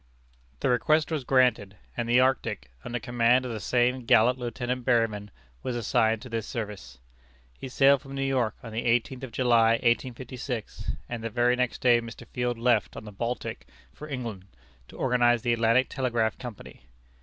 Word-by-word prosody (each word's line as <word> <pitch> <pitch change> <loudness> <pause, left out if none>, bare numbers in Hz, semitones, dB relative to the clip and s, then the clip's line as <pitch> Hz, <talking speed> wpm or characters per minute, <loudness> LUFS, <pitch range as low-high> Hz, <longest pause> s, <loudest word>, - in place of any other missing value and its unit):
The - - +1
request 155 +5 +2
was 155 -4 -1
granted, 125 -7 +2 0.2
and 120 -1 -3
the 120 +1 +5
Arctic, 130 - 0
under 120 0 -4
command 120 +2 +2
of 125 - -4
the 110 - -4
same 125 +2 +1
gallant 120 +3 +4
Lieutenant 125 +1 -3
Berryman, 115 -4 +1 0.3
was 125 - -3
assigned 110 -1 +1
to 125 - -9
this 115 -2 -3
service. 105 - -6 0.6
He 135 - -6
sailed 135 +1 +4
from 135 0 -9
New 135 - -1
York 125 -5 0
on 115 -2 -8
the 115 - -2
eighteenth 120 +2 0
of 130 - -6
July, 115 -2 +4
1856, 125 0 -2
and 115 -2 -5
the 115 - -2
very 120 +2 +2
next 125 -1 -2
day 120 -2 +4
Mr. 115 0 -10
Field 125 -1 -2
left 115 -8 +1
on - - -8
the 105 - -8
Baltic 115 +4 -4 0.3
for 150 - -10
England, 115 -8 -5 0.4
to - - -14
organize 120 -2 +2
the 120 -1 +2
Atlantic 115 +3 +3
Telegraph 120 -5 -1
Company. 110 - -10
120 Hz, 175 wpm, -27 LUFS, 115-125 Hz, 0.6 s, the